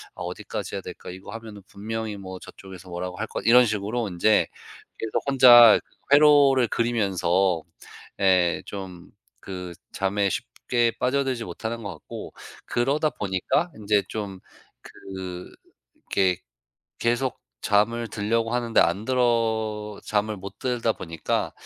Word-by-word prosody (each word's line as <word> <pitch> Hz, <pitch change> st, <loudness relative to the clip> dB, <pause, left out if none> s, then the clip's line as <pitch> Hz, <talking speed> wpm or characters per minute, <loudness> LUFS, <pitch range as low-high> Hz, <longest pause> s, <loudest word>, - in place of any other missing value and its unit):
아 -, -, -10 dB
어디까지 -, -, -5 dB
해야 -, -, -3 dB
될까? -, -, -9 dB
이거 95 Hz, +2 st, -10 dB
하면은 110 Hz, -3 st, -9 dB
분명히 110 Hz, +1 st, -5 dB
뭐 95 Hz, -1 st, -8 dB
저쪽에서 95 Hz, -1 st, -12 dB
뭐라고 90 Hz, +1 st, -5 dB
할 110 Hz, -, -2 dB
것' -, -, -5 dB
이런 125 Hz, +2 st, +7 dB
식으로 110 Hz, +2 st, -2 dB
인제 95 Hz, +4 st, +3 dB, 0.5 s
계속 110 Hz, -, -2 dB
혼자 120 Hz, -4 st, +8 dB
그거 -, -, -34 dB, 0.2 s
회로를 140 Hz, -4 st, +6 dB
그리면서 95 Hz, -6 st, +1 dB, 0.6 s
예 90 Hz, -3 st, +3 dB
좀 95 Hz, -3 st, -8 dB, 0.3 s
그 90 Hz, -2 st, -7 dB, 0.2 s
잠에 100 Hz, +1 st, 0 dB
쉽게 120 Hz, +4 st, -1 dB
빠져들지 130 Hz, -2 st, 0 dB
못하는 115 Hz, +1 st, -5 dB
것 100 Hz, -, -4 dB
같고 75 Hz, -, -9 dB, 0.3 s
그러다 140 Hz, +6 st, +1 dB
보니까 105 Hz, -, -1 dB
인제 105 Hz, -1 st, +1 dB
좀 100 Hz, -3 st, -5 dB, 0.4 s
그 95 Hz, -2 st, -8 dB, 0.4 s
이렇게 95 Hz, -2 st, 0 dB, 0.6 s
계속 120 Hz, +2 st, 0 dB, 0.2 s
잠을 115 Hz, +3 st, +1 dB
들려고 115 Hz, +3 st, -1 dB
하는데 120 Hz, -2 st, +2 dB
안 90 Hz, +5 st, +1 dB
들어 110 Hz, -4 st, 0 dB
잠을 105 Hz, 0 st, -1 dB
못 100 Hz, +1 st, -9 dB
들다 120 Hz, -3 st, 0 dB
보니까 80 Hz, -2 st, -3 dB
105 Hz, 270 characters per minute, -25 LUFS, 95-120 Hz, 0.6 s, 혼자